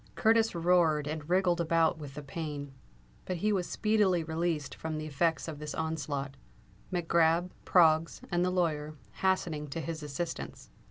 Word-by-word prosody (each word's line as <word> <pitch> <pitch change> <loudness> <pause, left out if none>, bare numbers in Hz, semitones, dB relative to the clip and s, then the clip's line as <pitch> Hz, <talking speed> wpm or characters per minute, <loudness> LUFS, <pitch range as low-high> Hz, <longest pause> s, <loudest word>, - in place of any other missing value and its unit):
Curtis 225 -1 +3
roared 165 -3 +3
and 150 +1 -5
wriggled 180 -1 +3
about 165 -1 +2
with 140 -3 -8
the 150 - -6
pain; 145 -1 -5 0.5
but 185 - -2
he 210 +5 +1
was 185 -3 -1
speedily 210 -6 +2
released 160 -2 -2
from 160 -1 -4
the 155 - -4
effects 160 +3 0
of 155 -3 -6
this 150 0 -5
onslaught, 145 -4 -3 0.5
Mac 175 -3 -2
Grab, 170 +2 +3
Proggs, 165 -2 +4
and 175 0 +2
the 180 - +2
lawyer, 155 -4 -1 0.2
hastening 170 - 0
to 145 +4 -5
his 165 0 -4
assistance. 150 +3 -5
165 Hz, 160 wpm, -30 LUFS, 150-175 Hz, 0.5 s, Proggs